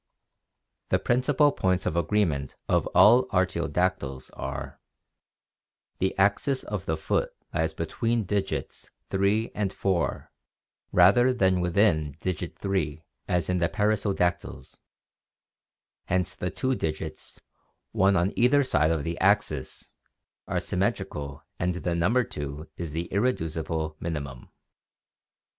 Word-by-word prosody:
The - - +3
principal 135 +4 +2
points 95 -6 0
of - - -1
agreement 85 -6 0
of - - +2
all 120 +4 +7
artiodactyls 90 -6 -1
are: - - -6 1.2
the 95 - 0
axis 105 +8 +2
of - - -5
the - - 0
foot - - -1 0.2
lies - - 0
between 115 -1 -1
digits 95 -8 -3 0.2
three 100 +4 +1
and 100 -2 -1
four 95 -4 -1 0.6
rather 100 +8 +6
than 95 -7 +2
within 85 -5 +2
digit 90 -1 -4
three 80 -6 -2 0.2
as 90 -3 0
in 90 0 0
the 85 0 +1
perissodactyls; 100 -4 -1 1.3
hence 90 0 0
the 90 - -3
two 130 +5 -1
digits, 80 -7 -5 0.5
one 95 +1 +3
on 90 +3 +1
either 135 +4 +4
side 80 - +2
of 80 -3 0
the 85 +1 -4
axis, 95 -9 0 0.5
are - - 0
symmetrical 70 -2 -3 0.2
and 90 -1 0
the 90 0 -2
number 105 +10 +2
two 75 -4 -6
is 85 -3 -5
the 85 +3 -3
irreducible 80 -8 -1
minimum. 70 -7 -5
90 Hz, 115 wpm, -27 LUFS, 80-105 Hz, 1.3 s, all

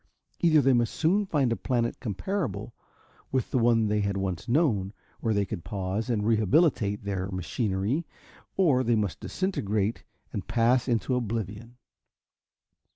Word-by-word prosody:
Either 155 -3 +5
they 135 0 +4
must 120 -2 +1
soon 195 +5 +2
find 140 -8 +1
a - - +2
planet 120 -2 -1
comparable 115 - -3 0.6
with 130 -3 -1
the 130 - +2
one 115 -1 +4
they 105 0 +1
had 100 -1 -1
once 95 -3 -3
known, 115 - +2 0.3
where 115 - 0
they 100 -1 +1
could 85 -2 -6
pause 95 +4 -3
and 105 -4 0
rehabilitate 110 - +2
their 95 -1 -3
machinery, 100 - -1 0.5
or 145 -9 +4
they 120 -1 +2
must 105 -5 -1
disintegrate 110 - -1 0.3
and 95 - -4
pass 120 +2 +2
into 120 +1 0
oblivion. 115 -1 -3
115 Hz, 145 wpm, -27 LUFS, 100-130 Hz, 0.6 s, Either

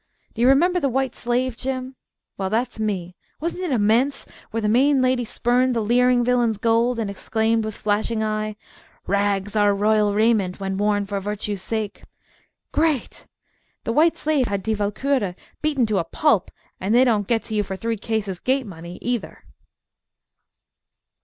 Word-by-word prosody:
Do - - -4
you 245 - +5
remember 350 +7 +4
The 280 - +1
White 265 +1 -1
Slave, 245 +1 -1
Jim? 260 +1 -4 0.4
Well, 190 -1 -2
that's 230 +2 -1
me. 185 -5 -2 0.2
Wasn't 335 +3 -3
it 360 - -2
immense 245 +4 +2 0.2
where 225 - -2
the 210 - 0
main 265 +6 +4
lady 255 -1 +2
spurned 245 +2 +1
the - - +1
leering 245 +2 +3
villain's 240 -3 +2
gold 230 +3 +2
and 225 -2 -1
exclaimed 220 +3 0
with 215 -1 -4
flashing 215 +1 0
eye, 215 0 -2 0.5
"Rags 200 0 0
are 205 -1 +4
royal 210 0 +2
raiment 210 -4 +2
when 195 0 -3
worn 205 -1 +1
for 200 0 -3
virtue's 205 0 -4
sake." 215 -2 -3 0.7
Great! 310 -5 -1 0.6
The 230 - -2
White 320 +5 +4
Slave 295 -5 +1
had 200 -1 -2
Die 220 - 0
Walkure 210 0 -1 0.3
beaten 290 -5 +1
to 215 -3 0
a - - 0
pulp, 210 - +1 0.3
and 200 +5 0
they 250 - +6
don't 215 -6 +1
get 230 -2 +1
to 220 - -6
you 210 - +2
for 190 -1 -5
three 230 +4 -2
cases 210 -3 -3
gate 265 0 0
money, 170 -2 -9
either. 245 -2 -3
225 Hz, 165 wpm, -22 LUFS, 205-250 Hz, 0.7 s, they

